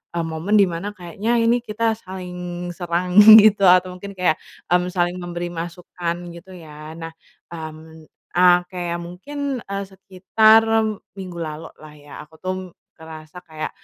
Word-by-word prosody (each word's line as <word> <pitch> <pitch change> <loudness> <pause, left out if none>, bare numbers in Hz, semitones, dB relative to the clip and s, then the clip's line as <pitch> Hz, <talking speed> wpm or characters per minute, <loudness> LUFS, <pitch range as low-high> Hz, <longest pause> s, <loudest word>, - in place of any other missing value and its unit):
e - - -2
momen 165 +6 -2
di 200 - +6
mana 175 +2 -5
kayaknya 195 +6 -3
ini 235 +1 +3
kita 230 0 -1
saling 180 -3 -7
serang, 180 +2 0 0.2
gitu. 210 -2 +5
Atau 180 0 +5
mungkin 200 +2 -10
kayak, 180 -4 +1 0.3
mmm, 180 0 +2
saling 175 0 -1
memberi 175 0 -5
masukan, 170 0 -5 0.2
gitu 180 +2 -13
ya. 155 -2 -11
Nah, 165 0 -7 0.4
mmm, 160 0 -10 0.3
e 175 - +1 0.3
kayak 175 -1 -3
mungkin, 275 +10 -5
eee, 200 -1 -5
sekitar 200 +4 +3 0.6
minggu 180 -2 -8
lalu 160 -1 -6
lah 155 -1 -14
ya, 145 -1 -17
aku 160 +1 -21
tuh 185 +2 -3 0.4
ngerasa 160 +2 -12
kayak, 155 -2 -6
180 Hz, 145 wpm, -21 LUFS, 165-190 Hz, 0.6 s, di